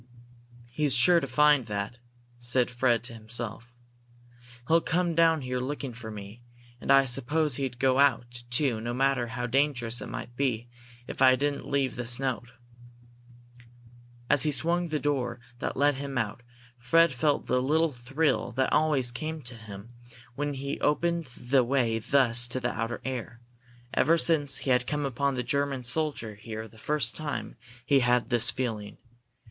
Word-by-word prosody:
"He's 140 +1 +1
sure 170 +8 +5
to 135 - -4
find 145 -1 +3
that," 105 +3 -4 0.4
said 120 0 +1
Fred 120 -2 +1
to 125 0 -9
himself. 115 +1 -6 0.9
"He'll 165 +1 +4
come 175 +1 0
down 165 -1 +3
here 125 -1 -3
looking 135 0 -4
for 115 -1 -9
me, 105 +2 -9 0.4
and - - -1
I 135 0 +6
suppose 135 +3 +1
he'd 135 -3 -3
go 130 +1 +2
out, 120 -3 +1
too, 120 -3 +2
no 120 +1 -3
matter 135 -2 +1
how 120 +2 -4
dangerous 125 -2 0
it - - -6
might 120 - -7
be, 120 -4 -1 0.4
if - - -8
I 130 -1 +7
didn't 145 +1 -2
leave 135 -3 0
this 120 0 +2
note." 125 -3 -3 1.8
As 140 - +3
he 155 - +3
swung 170 +4 +1
the 155 -2 -1
door 130 -5 -2 0.2
that - - -3
let 145 +2 +3
him 140 -1 -5
out, 110 +1 -2 0.4
Fred 165 +6 +4
felt 145 +4 0
the 125 0 +1
little 155 +4 +2
thrill 125 -2 -1
that 130 +2 0
always 145 -6 +2
came 155 +4 -5
to 120 0 -6
him 110 0 -11 0.4
when 145 +2 -3
he 140 +1 -4
opened 170 +2 +1
the 130 +1 +2
way 120 -3 +1
thus 120 -1 +3
to 125 +2 -2
the 125 -1 -1
outer 115 +2 -3
air. 125 -3 -5 0.5
Ever 165 +4 +3
since 155 -4 +2
he 135 - +1
had 125 -1 +2
come 150 -1 -1
upon 140 +1 -1
the 125 - -2
German 140 +1 -1
soldier 140 -5 -1
here 110 +1 -7
the 110 - -18
first 145 -4 -1
time, 155 -2 -5 0.3
he 140 0 +4
had 125 -1 +3
had - - -21
this 120 -2 +4
feeling. 110 -5 -3
130 Hz, 170 wpm, -28 LUFS, 120-145 Hz, 1.8 s, I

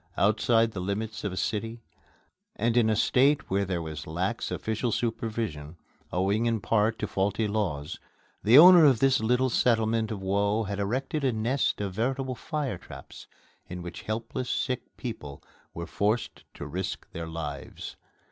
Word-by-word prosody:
Outside 115 +2 +3
the 100 - -6
limits 105 +4 -3
of 105 - -2
a 95 - -6
city 115 +3 -3 0.7
and 115 +2 0
in 115 -2 +4
a 110 - +2
state 135 +5 +2
where 100 +1 +1
there 90 -3 -2
was 80 -3 -7
lax 90 +8 -2
official 110 +2 -2
supervision, 110 -10 -3 0.3
owing 100 +5 +1
in 115 -1 +1
part 110 +3 +1
to 105 - -3
faulty 100 +3 0
laws, 90 -9 -2 0.4
the 115 +5 +6
owner 175 +1 +10
of 135 -5 +6
this 135 0 +4
little 125 +3 +1
settlement 115 -2 +2
of 110 -3 -4
woe 100 +3 +1
had 100 -1 -4
erected 130 +8 -2
a 130 - +3
nest 115 +5 0
of 100 -2 -3
veritable 130 +5 -1
fire 135 - -3
traps - - -12 0.4
in 90 0 -7
which 85 -1 -7
helpless 115 +3 -4
sick 130 -2 -3
people 75 - -7 0.3
were 85 - -4
forced 105 +7 -1
to - - -7
risk - - -4
their 85 0 -6
lives. 75 -4 -6
110 Hz, 160 wpm, -27 LUFS, 95-120 Hz, 0.7 s, owner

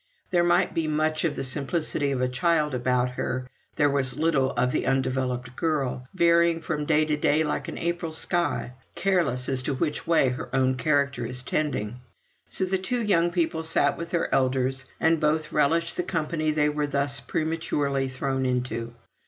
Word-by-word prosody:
There 175 -2 +3
might 175 +2 +2
be 165 -1 -1
much 155 +1 0
of 155 - 0
the - - -3
simplicity 145 +2 0
of 130 -2 -1
a 130 - +2
child 150 +2 +1
about 125 0 +1
her, 125 0 -3 0.3
there 145 - +3
was 135 -2 0
little 150 -4 +2
of 125 +1 +1
the - - -1
undeveloped 130 -1 -1
girl, 135 -5 -1
varying 170 -1 +4
from 150 -3 -3
day 155 0 +3
to 150 -1 +1
day 150 +1 +2
like 150 - -2
an - - -6
April 170 -1 -2
sky, 170 -5 -1 0.2
careless 165 -10 +1
as 130 -1 0
to 135 +1 -1
which 150 +3 -2
way 165 -6 +4
her 125 - -5
own 130 0 +3
character 140 -1 +1
is 125 +2 -4
tending. 130 -7 -2 0.5
So 190 - 0
the 190 0 0
two 235 +6 -1
young 175 -5 +3
people 170 -2 0
sat 160 -3 +1
with 170 - -6
their 170 - -1
elders, 130 0 +1
and 160 0 +3
both 155 0 0
relished 165 +3 +1
the - - +2
company 155 -1 -1
they 150 -1 +2
were 150 0 -1
thus 140 -1 -1
prematurely 145 -4 -1
thrown 130 0 -2
into. 125 -2 -2
150 Hz, 180 wpm, -26 LUFS, 130-165 Hz, 0.5 s, varying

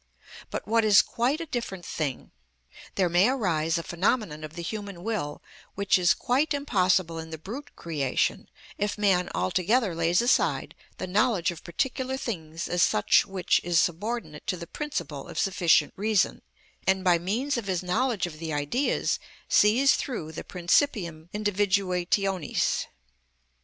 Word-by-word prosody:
But, - - -5
what 225 +1 +3
is 210 -2 +6
quite 255 +7 0
a 335 - -4
different 215 - -5
thing, 145 -5 -4 0.6
there 190 -2 +2
may 175 +6 +4
arise 165 -11 0
a 170 - -3
phenomenon 175 -3 -1
of 155 +1 -8
the 170 - -5
human 200 0 -6
will 195 -10 -3 0.3
which 200 -1 +2
is 175 -1 +4
quite 285 +5 +1
impossible 185 - +1
in 160 0 -7
the 160 - -6
brute 245 - -8
creation, 145 -6 -1 0.3
if 205 +1 -1
man 190 -4 +2
altogether 185 - +1
lays 165 +2 +2
aside 240 +2 +1 0.2
the - - -4
knowledge 195 -1 +2
of 170 - -11
particular 260 - -2
things 165 -10 -5
as 175 0 0
such 105 - +4
which 190 -2 +1
is 175 -1 +2
subordinate 180 -3 -2
to 185 - -1
the 170 - -7
principle 170 - -5
of - - -9
sufficient 170 -5 +3
reason, 210 -1 +1 0.5
and 190 0 +2
by 175 -2 +4
means 230 +11 -1
of 235 -4 -3
his 185 -2 -1
knowledge 215 +2 0
of 155 -3 -8
the 160 -1 -4
Ideas 145 - 0 0.3
sees 240 +7 +5
through 190 - -4
the 160 - -7
principium 175 - 0
individuationis. 195 -3 0
185 Hz, 150 wpm, -27 LUFS, 170-220 Hz, 0.6 s, is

